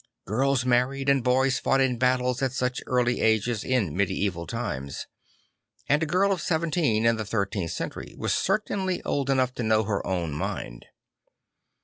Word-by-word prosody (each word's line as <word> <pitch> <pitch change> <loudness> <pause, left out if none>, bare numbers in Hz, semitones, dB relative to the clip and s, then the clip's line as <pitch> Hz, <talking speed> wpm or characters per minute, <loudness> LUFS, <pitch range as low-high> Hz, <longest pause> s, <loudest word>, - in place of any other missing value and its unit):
Girls 130 +4 +1
married 130 +3 +1
and 135 -3 +3
boys 130 +1 +2
fought 135 - +2
in 130 -3 +1
battles 125 0 +1
at 130 -2 0
such 125 0 -1
early 125 -1 +1
ages 110 0 +1
in 115 - 0
medieval 95 -2 -1
times; 70 - -4 0.8
and 150 +2 +3
a 160 - 0
girl 185 +5 +2
of 185 -4 -1
seventeen 155 -9 +1
in 115 0 +4
the 110 - -2
thirteenth 100 -4 -2
century 85 - -5
was - - -1
certainly 190 -2 0
old 140 -1 -1
enough 130 -2 +2
to 125 - -5
know 110 -1 +2
her 100 -1 -2
o\vn 85 -4 -1
mind. - - -5
125 Hz, 160 wpm, -26 LUFS, 110-135 Hz, 0.8 s, in